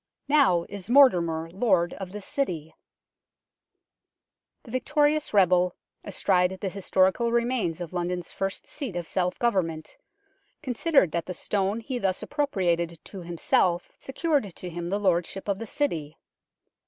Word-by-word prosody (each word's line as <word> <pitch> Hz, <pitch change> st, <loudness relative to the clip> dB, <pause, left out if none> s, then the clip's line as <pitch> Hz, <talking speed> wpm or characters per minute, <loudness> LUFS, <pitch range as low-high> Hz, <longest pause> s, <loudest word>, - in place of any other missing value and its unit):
" -, -, -57 dB
Now 270 Hz, -, +4 dB
is 200 Hz, 0 st, -8 dB
Mortimer 175 Hz, -, +5 dB
lord 190 Hz, -5 st, +2 dB
of 190 Hz, -2 st, -7 dB
this 205 Hz, -1 st, -8 dB
city! 175 Hz, -, -2 dB, 1.0 s
" -, -, -59 dB
The 230 Hz, -, -12 dB
victorious 295 Hz, +4 st, +1 dB
rebel, 180 Hz, -3 st, +4 dB, 0.3 s
astride 190 Hz, -1 st, +1 dB
the 195 Hz, -, -2 dB
historical 190 Hz, +4 st, +1 dB
remains 235 Hz, -8 st, 0 dB
of 175 Hz, -1 st, -6 dB
London's 175 Hz, 0 st, -3 dB
first 195 Hz, 0 st, -3 dB
seat 270 Hz, -, -6 dB
of 175 Hz, -2 st, -4 dB
self 180 Hz, -1 st, -1 dB
government, 165 Hz, -9 st, -1 dB, 0.7 s
considered 265 Hz, -, +2 dB
that 170 Hz, +1 st, -2 dB
the 180 Hz, -, -5 dB
stone 200 Hz, +4 st, -1 dB
he 250 Hz, +2 st, -4 dB
thus 190 Hz, -4 st, -1 dB
appropriated 180 Hz, -, 0 dB
to 195 Hz, -, -8 dB
himself 175 Hz, +1 st, +1 dB
secured 270 Hz, -, -1 dB
to 180 Hz, -, -7 dB
him 170 Hz, +1 st, -5 dB
the 200 Hz, -, 0 dB
lordship 185 Hz, 0 st, 0 dB
of 200 Hz, -1 st, -1 dB
the 225 Hz, -, -6 dB
City. 165 Hz, -, -2 dB
190 Hz, 140 wpm, -26 LUFS, 175-235 Hz, 1.0 s, Mortimer